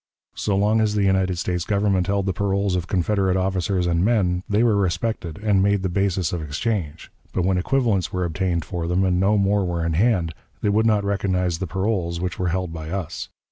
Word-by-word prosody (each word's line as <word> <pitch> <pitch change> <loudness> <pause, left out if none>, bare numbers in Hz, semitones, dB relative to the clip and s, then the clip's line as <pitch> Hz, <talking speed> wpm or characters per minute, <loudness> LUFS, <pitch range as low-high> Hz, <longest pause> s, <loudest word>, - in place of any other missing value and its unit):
So 100 - -1
long 105 +3 +3
as 105 -1 +1
the 105 - +2
United 95 -2 +2
States 90 0 -1
Government 100 -2 +1
held 100 -1 0
the 95 - 0
paroles 100 -1 0
of 90 -1 -2
Confederate 95 0 +1
officers 95 -1 0
and 85 0 +1
men, 95 -5 +2
they 105 +3 +3
were 115 -3 +3
respected 95 -2 -1
and 100 -3 +3
made 100 0 +2
the 95 - 0
basis 95 -4 0
of 85 - -2
exchange; 80 +1 -3 0.2
but 90 - 0
when 95 -1 +2
equivalents 115 -3 +1
were 90 -1 -1
obtained 85 -1 -1
for 85 -3 -4
them, 90 +2 +1
and 90 -1 +2
no 100 +3 +3
more 100 0 +2
were 85 -2 -2
in 85 - 0
hand, 90 -3 +2 0.3
they 105 - +2
would 110 +2 +3
not 105 -2 +2
recognize 90 -4 0
the 95 - -3
paroles 95 -2 -1
which 90 0 -3
were 90 - 0
held 90 -1 -2
by 80 -1 -6
us. 90 -4 -4
95 Hz, 215 wpm, -23 LUFS, 90-100 Hz, 0.3 s, long